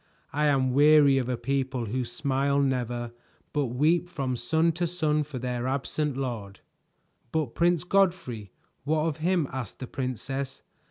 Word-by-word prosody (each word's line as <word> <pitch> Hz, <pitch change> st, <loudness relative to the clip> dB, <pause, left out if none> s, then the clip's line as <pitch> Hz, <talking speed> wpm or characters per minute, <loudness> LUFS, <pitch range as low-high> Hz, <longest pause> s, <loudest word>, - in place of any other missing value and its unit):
I 150 Hz, +1 st, +1 dB
am 130 Hz, -3 st, +2 dB
weary 145 Hz, -1 st, +6 dB
of 125 Hz, -1 st, -2 dB
a 125 Hz, -, 0 dB
people 135 Hz, -2 st, -1 dB
who 125 Hz, +4 st, -2 dB
smile 140 Hz, -1 st, 0 dB
never 120 Hz, -3 st, -1 dB, 0.4 s
but 145 Hz, -3 st, +1 dB
weep 155 Hz, +8 st, +2 dB
from 135 Hz, -6 st, -2 dB
sun 160 Hz, +8 st, +2 dB
to 175 Hz, +2 st, -1 dB
sun 155 Hz, -3 st, +1 dB
for 145 Hz, -2 st, -5 dB
their 125 Hz, 0 st, -2 dB
absent 140 Hz, +1 st, -1 dB
lord." 110 Hz, -7 st, -4 dB, 0.7 s
"But 155 Hz, -7 st, -1 dB
Prince 175 Hz, -1 st, +2 dB
Godfrey; 175 Hz, -, +1 dB, 0.3 s
what 155 Hz, +2 st, +1 dB
of 160 Hz, -3 st, -1 dB
him?" 170 Hz, -1 st, +1 dB
asked 130 Hz, -6 st, -5 dB
the 130 Hz, -, -6 dB
princess. 135 Hz, +2 st, -4 dB
135 Hz, 155 wpm, -27 LUFS, 125-155 Hz, 0.7 s, weary